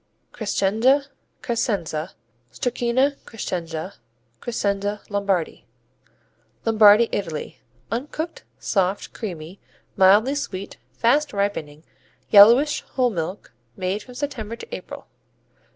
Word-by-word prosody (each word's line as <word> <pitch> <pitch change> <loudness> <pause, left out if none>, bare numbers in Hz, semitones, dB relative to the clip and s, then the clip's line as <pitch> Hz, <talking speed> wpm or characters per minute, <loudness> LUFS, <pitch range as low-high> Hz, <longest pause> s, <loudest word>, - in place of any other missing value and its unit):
Crescenza, 220 +6 +2 0.4
Carsenza, 200 -10 -2 0.4
Stracchino 250 +3 0
Crescenza, 175 -4 -5 0.4
Crescenza 205 -3 -2
Lombardi 200 -5 -1 1.0
Lombardy, 220 0 +6
Italy 165 -7 -4 0.3
Uncooked; 300 +7 -4
soft; 195 -1 -1
creamy; 180 -4 -7 0.4
mildly 205 +7 +5
sweet; 200 -9 -5 0.2
fast 280 - +2
ripening; 165 -7 -2 0.5
yellowish; 235 +9 +7
whole 250 -2 +2
milk. 175 - -5 0.2
Made 190 +2 -2
from 250 +3 -13
September 235 -6 -4
to - - -8
April. - - -9
205 Hz, 90 wpm, -23 LUFS, 190-240 Hz, 1.0 s, yellowish